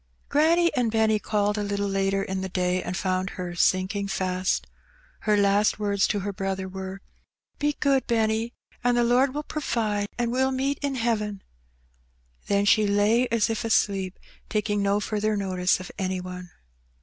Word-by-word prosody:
Granny 335 +4 +3
and 245 -3 +2
Benny 220 -1 +2
called 210 0 0
a - - -1
little 200 0 -1
later 195 0 0
in 190 -1 -3
the 190 - -4
day, 180 0 0
and 180 0 -4
found 185 +1 -1
her 180 -1 -4
sinking 185 +3 +1
fast. 185 -1 -1 0.6
Her 210 - +5
last 200 +1 +3
words 200 -1 +1
to 205 - -1
her 200 +1 -3
brother 195 -1 -3
were: 190 0 -7 0.6
''Be 295 0 0
good, 275 -2 +2
Benny, 225 0 0 0.3
an' 245 0 +3
the 240 - +3
Lord 255 +3 +3
will 300 - -2
provide, 220 -9 -1
an* 240 -1 0
we'll 260 +2 +2
meet 270 +2 -1
in 280 -2 -1
heaven." 210 -4 -1 1.0
Then 200 0 +2
she 210 +1 +4
lay 210 +5 +3
as 230 -2 +2
if 225 -2 -2
asleep, 195 -4 +1 0.3
taking 210 -1 0
no 200 +1 +2
further 215 0 -1
notice 185 -2 +1
of 185 - -8
any 185 -1 -1
one. 180 0 -7
205 Hz, 170 wpm, -25 LUFS, 190-230 Hz, 1.0 s, Her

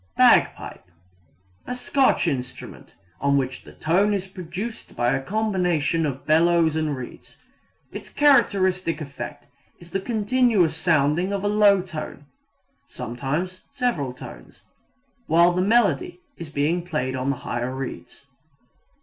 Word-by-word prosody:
Bagpipe 85 - +3 0.8
A 250 - -3
Scotch 250 -4 +2
instrument 130 -5 -5 0.2
on 140 0 +2
which 130 -1 -2
the - - -14
tone 195 +6 +1
is 190 -1 -3
produced 190 +4 -7
by 120 +1 +1
a 135 - -1
combination 180 -4 0
of 135 -1 -6
bellows 165 0 +3
and 155 -3 -1
reeds. 125 -2 -10 0.5
Its - - -8
characteristic 190 - +3
effect 140 -5 -7 0.3
is 170 0 -16
the 195 - -1
continuous 215 -5 +2
sounding 160 +2 +1
of 200 -1 -2
a - - +1
low 205 -2 +4
tone 155 -5 -7 0.6
(sometimes 145 +10 -4
several 175 - -1
tones) 125 - -12 0.6
while 170 +2 +5
the 180 +1 0
melody 240 - +2 0.2
is 165 - -9
being 150 +4 0
played 150 -7 -2
on 130 +1 -2
the 140 - +1
higher 120 +1 -2
reeds. 135 +1 -7
170 Hz, 130 wpm, -23 LUFS, 140-200 Hz, 0.8 s, while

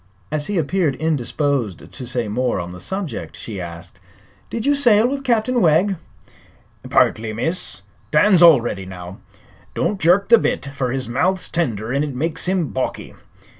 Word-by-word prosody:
As 150 -1 -1
he 205 - -1
appeared 165 -2 +1
indisposed 140 - -1
to 125 -3 -8
say 120 -2 -1
more 120 +1 -1
on 85 0 -5
the 90 - -9
subject 190 - -4
she 100 -5 -6
asked: 85 +1 -9 0.5
"Did 230 - -4
you 285 - +4
sail 240 -6 +4
with 275 +1 -3
Captain 240 -1 +1
Wegg?" 180 +4 +3 0.9
"Partly, 110 0 +2
miss. 165 +11 -3 0.3
Dan's 195 -4 +4
already 120 - +5
now. 90 0 -9 0.6
Don't 205 -2 -1
jerk 180 +5 +3
the 235 -1 +8
bit, - - -1
fer 140 -2 -3
his 130 +1 -2
mouth's 180 +10 0
tender 120 - -2
an' 140 +1 +1
it 145 -3 -4
makes 160 +6 -2
him 180 -6 0
balky. 130 - -4
150 Hz, 160 wpm, -20 LUFS, 115-190 Hz, 0.9 s, the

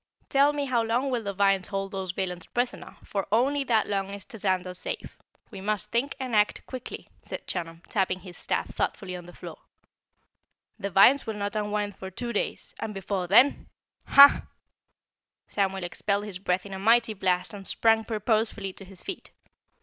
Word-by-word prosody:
Tell 280 +1 +5
me, 290 -1 -2
how 250 -3 +2
long 240 +4 0
will 245 -2 0
the 200 -2 -3
vines 195 -1 +2
hold 195 -1 -3
those 190 -1 -4
villains 180 -2 -4
prisoner, 245 +1 -3
for 195 -2 -3
only 275 +6 +3
that 225 -4 +3
long 195 -1 -1
is 200 0 -7
Tazander 185 -4 -2
safe. - - -6 0.3
We 195 -3 -8
must 210 +1 -2
think 255 +5 0
and 255 -4 -2
act 210 0 +2
quickly," 255 -1 -7
said - - -7
Chunum, 165 +1 -5
tapping 185 -2 0
his 180 -1 -11
staff - - -2
thoughtfully 185 -2 -2
on 175 -1 -9
the 175 - -12
floor. - - -9 1.2
"The 200 -1 -2
vines 235 +9 +6
will 220 - -2
not 205 0 -3
unwind 210 -1 -1
for 190 - -7
two 235 +5 -5
days 210 - -3
and 215 -2 -4
before 190 -1 -2
THEN 245 +9 +5 0.4
HAH!" 280 0 +8 1.0
Samuel 195 -2 -1
expelled 200 +3 -1
his 195 -4 -6
breath 180 0 0
in 200 - -8
a 190 - -5
mighty 230 +2 +4
blast 185 -2 0
and 195 -2 -8
sprang 225 -1 +3
purposefully 215 -2 -1
to 195 - -11
his 185 -1 -11
feet. 385 - -6
205 Hz, 180 wpm, -27 LUFS, 190-230 Hz, 1.2 s, HAH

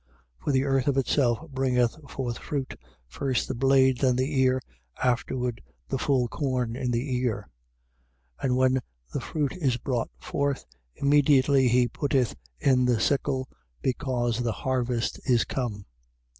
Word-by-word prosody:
4:28. - - -26
For - - +2
the 135 -1 +3
earth 135 -1 +1
of 140 -1 +2
itself 135 +2 +1
bringeth 125 -3 +1
forth 120 -3 -4
fruit, 140 -3 -3 0.3
first 130 - -1
the - - -2
blade, 130 0 +4
then 130 -2 +3
the 130 +2 0
ear, 130 0 +3 0.4
afterwards 125 -1 0 0.3
the 135 - -1
full 130 -3 +2
corn 125 -3 -1
in 125 -1 -2
the 125 +2 -1
ear. 110 -5 -2 0.9
4:29. - - -14
And 125 -1 +2
when 130 0 +3 0.3
the - - -2
fruit 145 -4 -2
is 135 -8 +1
brought 125 -2 -2
forth, 140 - -2 0.3
immediately 140 -2 +4
he 125 0 +4
putteth 130 -1 0 0.2
in 125 -2 +3
the 120 -3 +2
sickle, 130 +3 0 0.4
because 125 -3 0
the 120 -2 0
harvest 125 -2 0
is 120 -2 +4
come. 110 -6 -3
130 Hz, 150 wpm, -27 LUFS, 120-135 Hz, 0.9 s, blade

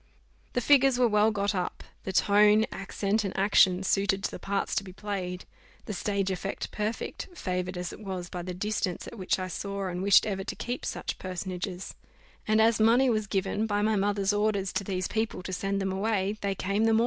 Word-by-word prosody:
The 245 - +1
figures 270 -1 +5
were 250 -1 +4
well 210 0 +4
got 205 -1 0
up; 180 -2 -3 0.2
the 190 - -2
tone, 210 +3 +5
accent, 200 +2 -1
and 195 -2 -4
action, 190 -1 +4
suited 195 0 +1
to - - -1
the - - -7
parts 200 0 -2
to - - 0
be 190 - -9
played; 185 -3 -4 0.4
the 210 - -4
stage 195 0 -1
effect 190 +1 -4
perfect, 215 - -3
favoured 180 - -3
as 180 -1 -4
it - - -10
was 190 -4 -5
by 175 0 -5
the 180 +1 -5
distance 195 -2 -2
at 235 - -9
which 185 - +1
I 185 -1 -3
saw 200 +2 -4
and 180 0 -4
wished 200 0 +6
ever 195 -2 -2
to - - -5
keep 245 +1 -4
such - - -4
personages; 185 0 -5 0.5
and 215 0 +3
as 225 0 +4
money 240 +4 +5
was 215 -2 0
given, 195 +2 -1
by 205 -1 0
my 215 0 +2
mother's 200 0 +1
orders, 205 -2 0
to 205 - -1
these 185 -1 -2
people 220 -4 -2
to 185 - -5
send 195 +1 -1
them 190 -1 -1
away, 200 0 0
they 200 -1 -1
came 200 +4 0
the 225 - +4
more. - - +4
200 Hz, 210 wpm, -28 LUFS, 190-215 Hz, 0.5 s, wished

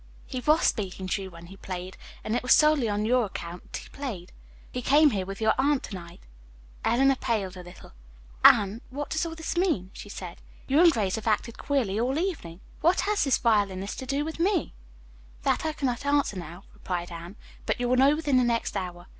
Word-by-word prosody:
He 255 - -5
was 305 +5 +3
speaking 190 -3 -1
to 195 - 0
you 190 - -6
when 170 -1 -12
he 190 +3 -12
played, 185 -1 -6 0.3
and 220 - -1
it - - 0
was 250 - +5
solely 300 -6 +4
on 205 +1 -1
your 245 +1 +3
account 175 -3 -7
that - - -3
he - - -11
played. 220 -11 -6 0.4
He 250 - -4
came 290 +4 +5
here 190 -4 -2
with 195 0 -6
your 220 -1 +3
aunt 280 0 +2
to - - -8
night." 170 -2 -9 0.6
Eleanor 270 +2 +3
paled 200 -7 -2
a 180 - -8
little. 175 - -13 0.5
"Anne, 205 +3 +6
what 285 +3 -5
does 320 +1 0
all 325 - -6
this 320 +1 -4
mean?" 325 - 0
she 205 - -10
said. 180 -4 -8 0.2
"You 275 +3 +2
and 340 0 +8
Grace 205 -6 -1
have 220 - -6
acted 220 +1 0
queerly 240 -8 0
all 255 +4 0
evening. 300 - -3 0.2
What 345 +3 +3
has 415 -4 +1
this 275 - +3
violinist 200 -4 0
to 260 - -6
do 280 +3 0
with 320 +1 -6
me!" 365 0 +1 0.7
"That - - +1
I 310 - -1
cannot 255 -5 -2
answer 285 -6 +1
now," 175 +1 -8
replied 175 -1 -4
Anne, 170 +3 -8 0.3
"but - - 0
you 245 - 0
will 250 - +3
know 275 +3 +5
within 295 -4 +1
the 250 - +4
next 235 -1 0
hour. 175 -1 -5
230 Hz, 215 wpm, -27 LUFS, 190-285 Hz, 0.7 s, and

